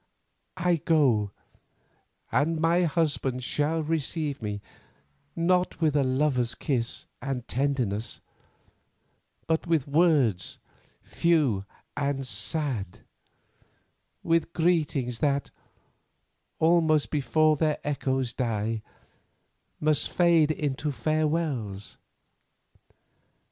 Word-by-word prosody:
I 180 Hz, -1 st, +2 dB
go, 135 Hz, -10 st, +2 dB, 1.0 s
and 155 Hz, +4 st, +1 dB
my 170 Hz, +2 st, +3 dB
husband 145 Hz, -6 st, 0 dB
shall 150 Hz, +5 st, 0 dB
receive 155 Hz, -2 st, -2 dB
me, 105 Hz, -1 st, -3 dB, 0.8 s
not 180 Hz, +2 st, +1 dB
with 155 Hz, -3 st, +2 dB
a 145 Hz, -, +3 dB
lover's 130 Hz, -2 st, +1 dB
kiss 120 Hz, -4 st, -2 dB, 0.2 s
and 125 Hz, -2 st, -4 dB
tenderness, 120 Hz, -6 st, -1 dB, 1.3 s
but 160 Hz, +2 st, 0 dB
with 160 Hz, -5 st, +1 dB
words 140 Hz, -, +2 dB, 0.5 s
few 145 Hz, -, +1 dB, 0.3 s
and 140 Hz, -1 st, -1 dB
sad, 110 Hz, -, -2 dB, 1.2 s
with 165 Hz, 0 st, +1 dB
greetings 150 Hz, -8 st, +1 dB
that, 140 Hz, -2 st, 0 dB, 1.1 s
almost 160 Hz, -2 st, +3 dB
before 155 Hz, +1 st, +3 dB
their 150 Hz, 0 st, +1 dB
echoes 130 Hz, -4 st, -1 dB
die, 115 Hz, -2 st, -2 dB, 1.0 s
must 155 Hz, -1 st, +1 dB
fade 170 Hz, -3 st, +4 dB
into 150 Hz, -1 st, -2 dB
farewells. 150 Hz, -9 st, -2 dB
145 Hz, 85 wpm, -27 LUFS, 125-160 Hz, 1.3 s, fade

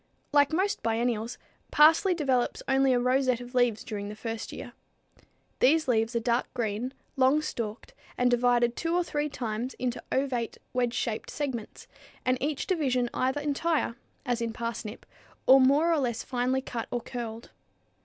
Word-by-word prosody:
_ -, -, -41 dB, 0.3 s
Like 285 Hz, 0 st, +5 dB
most 380 Hz, +6 st, 0 dB
biennials, 230 Hz, 0 st, -1 dB, 0.3 s
parsley 325 Hz, +5 st, +5 dB
develops 265 Hz, -6 st, 0 dB
only 270 Hz, 0 st, +3 dB
a 250 Hz, -, +3 dB
rosette 255 Hz, 0 st, +2 dB
of 245 Hz, +1 st, -10 dB
leaves 245 Hz, -3 st, +2 dB
during 205 Hz, -3 st, -5 dB
the 210 Hz, -, -7 dB
first 225 Hz, +1 st, -5 dB
year. -, -, -8 dB, 0.9 s
These 310 Hz, +4 st, +4 dB
leaves 225 Hz, -1 st, +1 dB
are -, -, +3 dB
dark 235 Hz, +1 st, 0 dB
green, 235 Hz, +2 st, -2 dB, 0.2 s
long 265 Hz, +4 st, +4 dB
stalked 230 Hz, -, -5 dB, 0.2 s
and 245 Hz, 0 st, +3 dB
divided 240 Hz, -1 st, +3 dB
two 330 Hz, 0 st, -1 dB
or 355 Hz, -, +3 dB
three 300 Hz, -3 st, -2 dB
times 240 Hz, -1 st, -4 dB
into 250 Hz, -1 st, -3 dB
ovate, 260 Hz, -4 st, -1 dB, 0.2 s
wedge 245 Hz, -1 st, 0 dB
shaped 220 Hz, -2 st, -2 dB
segments, 265 Hz, -7 st, -5 dB, 0.4 s
and 255 Hz, 0 st, +1 dB
each 290 Hz, +1 st, -1 dB
division 260 Hz, -9 st, 0 dB
either 265 Hz, +3 st, 0 dB
entire, 295 Hz, -2 st, 0 dB, 0.3 s
as 245 Hz, -2 st, -1 dB
in 230 Hz, -1 st, -2 dB
parsnip, 230 Hz, -1 st, -5 dB, 0.4 s
or 265 Hz, +1 st, +8 dB
more 290 Hz, +6 st, +4 dB
or 320 Hz, -, +2 dB
less 240 Hz, -4 st, -1 dB
finely 255 Hz, +1 st, 0 dB
cut 235 Hz, -3 st, -4 dB
or 245 Hz, -, -2 dB
"curled." 230 Hz, -2 st, -6 dB
250 Hz, 165 wpm, -28 LUFS, 235-280 Hz, 0.9 s, or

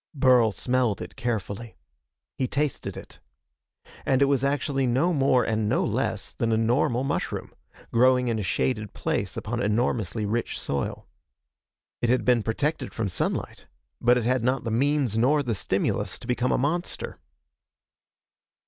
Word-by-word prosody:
Burl 125 Hz, -5 st, +5 dB
smelled 125 Hz, -1 st, 0 dB
it -, -, -8 dB
carefully. 115 Hz, -, -4 dB, 0.6 s
He 130 Hz, -, -1 dB
tasted 145 Hz, 0 st, -2 dB
it. -, -, -11 dB, 0.8 s
And 130 Hz, -1 st, +2 dB
it 140 Hz, -, +5 dB
was 140 Hz, -2 st, +1 dB
actually 140 Hz, -1 st, 0 dB
no 135 Hz, +9 st, +2 dB
more 135 Hz, -4 st, +3 dB
and 110 Hz, -2 st, 0 dB
no -, -, +2 dB
less -, -, -2 dB
than 115 Hz, -1 st, -1 dB
a 110 Hz, -, +3 dB
normal 120 Hz, +2 st, +2 dB
mushroom, 140 Hz, +1 st, -3 dB, 0.4 s
growing 125 Hz, +1 st, +4 dB
in 115 Hz, -2 st, 0 dB
a -, -, -1 dB
shaded 105 Hz, +3 st, -1 dB
place -, -, -2 dB
upon 120 Hz, +3 st, -3 dB
enormously 110 Hz, -1 st, 0 dB
rich 115 Hz, +3 st, -2 dB
soil. 70 Hz, -1 st, -3 dB, 0.9 s
It 120 Hz, -, +1 dB
had 125 Hz, +1 st, +2 dB
been 125 Hz, -2 st, +4 dB
protected 130 Hz, +5 st, -2 dB
from 110 Hz, -4 st, -1 dB
sunlight, -, -, -3 dB, 0.3 s
but 120 Hz, +1 st, +5 dB
it 120 Hz, -, -1 dB
had 125 Hz, -1 st, +1 dB
not 130 Hz, +2 st, +1 dB
the 115 Hz, -, -3 dB
means 130 Hz, -2 st, +1 dB
nor 145 Hz, +5 st, +3 dB
the 120 Hz, -4 st, -1 dB
stimulus 95 Hz, +1 st, -1 dB
to -, -, -12 dB
become 125 Hz, +1 st, 0 dB
a -, -, +2 dB
monster. 165 Hz, +7 st, -2 dB
120 Hz, 155 wpm, -26 LUFS, 110-135 Hz, 0.9 s, Burl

